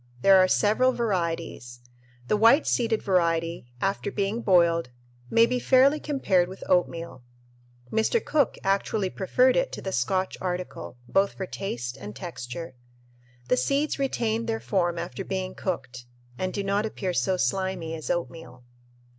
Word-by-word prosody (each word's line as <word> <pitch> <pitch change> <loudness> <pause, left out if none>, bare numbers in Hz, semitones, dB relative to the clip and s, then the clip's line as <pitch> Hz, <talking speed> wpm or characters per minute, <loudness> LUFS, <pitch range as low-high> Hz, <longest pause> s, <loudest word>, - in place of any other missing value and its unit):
There 195 -1 +7
are 185 - +5
several 220 +7 +3
varieties. 170 - -3 0.5
The - - +2
white 230 +8 +5
seeded 230 -3 +1
variety, 170 -5 0
after 195 +3 -1
being 205 +3 -1
boiled, 170 - +3 0.4
may 230 0 +5
be 250 +1 -1
fairly 270 +4 +4
compared 195 -13 +1
with 190 - -9
oatmeal. 170 -6 0 0.7
Mr. 220 - +2
Cook 290 -6 +1
actually 195 0 0
preferred 250 +7 +2
it - - +1
to - - -5
the 190 - -3
Scotch 185 +7 -1
article, 180 -7 -5
both 195 +7 +2
for 190 - -5
taste 120 -11 -5
and 105 -4 -9
texture. 165 -2 -7 0.7
The 125 - +2
seeds 280 - 0
retain 230 -4 -1
their 225 -1 -1
form 175 -4 0
after 175 +3 -5
being 185 -1 -3
cooked 125 -9 -5 0.3
and 185 +7 -2
"do 200 - -3
not 200 +1 0
appear 190 -4 -3
so 185 +1 +1
slimy 180 +2 -1
as 155 -2 -6
oatmeal." 165 -7 -4
190 Hz, 145 wpm, -26 LUFS, 170-220 Hz, 0.7 s, There